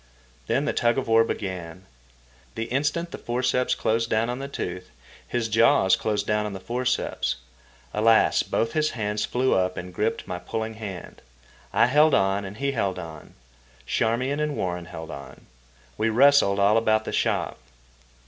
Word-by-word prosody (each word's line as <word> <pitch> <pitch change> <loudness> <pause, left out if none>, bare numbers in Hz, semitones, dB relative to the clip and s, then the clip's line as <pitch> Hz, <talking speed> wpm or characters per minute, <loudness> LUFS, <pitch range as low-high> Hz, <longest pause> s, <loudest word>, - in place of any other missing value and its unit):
Then - - +1
the - - 0
tug 120 +1 +2
of 135 - -1
war 115 0 +5
began. 95 -5 -5 0.7
The 115 - -2
instant 150 +7 -1
the - - -7
forceps 125 +1 0
closed 115 +1 0
down 115 +2 +1
on 125 - -4
the 135 - -5
tooth, 90 -9 -5 0.4
his 120 -2 -1
jaws 110 -4 +4
closed 105 -1 -1
down 105 0 0
on 105 - -6
the 95 - -6
forceps. 125 +5 -1 0.6
Also, 110 +1 +4
both 115 - 0
his 155 -1 +2
hands 105 -1 -1
flew 130 +1 +1
up 90 0 +1
and 90 0 -6
gripped 110 +4 -1
my 90 -1 -4
pulling 110 +5 -4
hand. 105 -5 -8 0.5
I - - +4
held 150 +4 +4
on, 95 0 +1
and 100 +2 -8
he 140 +2 0
held 100 -8 -1
on. 80 -4 -9 0.5
Charmian 125 - 0
and 150 -1 -1
Warren 90 -2 -2
held 80 -1 -8
on. 70 -2 -10 0.5
We 110 +1 +2
wrestled 120 -4 +5
all 100 +2 +4
about 110 -1 +2
the - - -5
shop. - - 0
110 Hz, 165 wpm, -25 LUFS, 95-125 Hz, 0.7 s, war